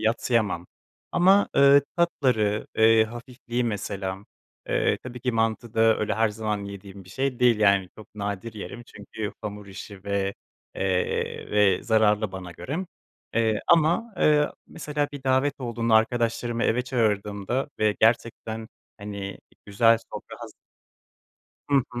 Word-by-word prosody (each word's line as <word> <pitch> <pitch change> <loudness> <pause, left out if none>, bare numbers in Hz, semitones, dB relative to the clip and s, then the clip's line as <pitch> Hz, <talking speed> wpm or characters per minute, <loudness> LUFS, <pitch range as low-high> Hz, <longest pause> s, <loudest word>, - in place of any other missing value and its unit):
yadsıyamam 110 -5 0 0.5
ama, 195 +3 +5
eee, 140 0 +7
tatları, 125 -11 +1
eee, 110 0 +6
hafifliği, 120 +1 -5
mesela. 100 -3 -3 0.5
Eee, - - +1
tabii 125 -1 -8
ki 125 +1 -1
mantı 115 0 -1
da 110 0 +4
öyle 105 - -1
her 110 0 +2
zaman 105 -1 -3
yediğim 100 -1 -10
bir - - -18
şey 135 +1 -2
değil, 120 -3 +4
yani, 100 -3 +4
çok 110 - -14
nadir 100 +2 -4
yerim 115 +3 -7
çünkü 105 +1 -7
hamur 105 -1 -6
işi 100 0 -10
ve, 100 -1 -1 0.4
eee, 95 -2 -1
ve 105 -3 +3
zararlı 110 -2 +2
bana 95 -2 -7
göre, 155 - -5 0.5
eee, 110 -2 +2
ama, 170 +8 +3
eee, 150 -2 +4 0.2
mesela 150 -2 -3
bir 145 - -8
davet 130 +2 +1
olduğunda 115 -2 0
arkadaşlarımı 115 +1 +1
eve 125 +3 +2
çağırdığımda 110 0 -1
ve 105 -1 +2
gerçekten 115 -1 0 0.3
hani 100 -1 -6 0.3
güzel 115 +3 +4
sofra - - -8
hazır - - -10 1.2
Hı 140 - +5
hı. 120 -1 -5
110 Hz, 135 wpm, -25 LUFS, 100-125 Hz, 1.2 s, eee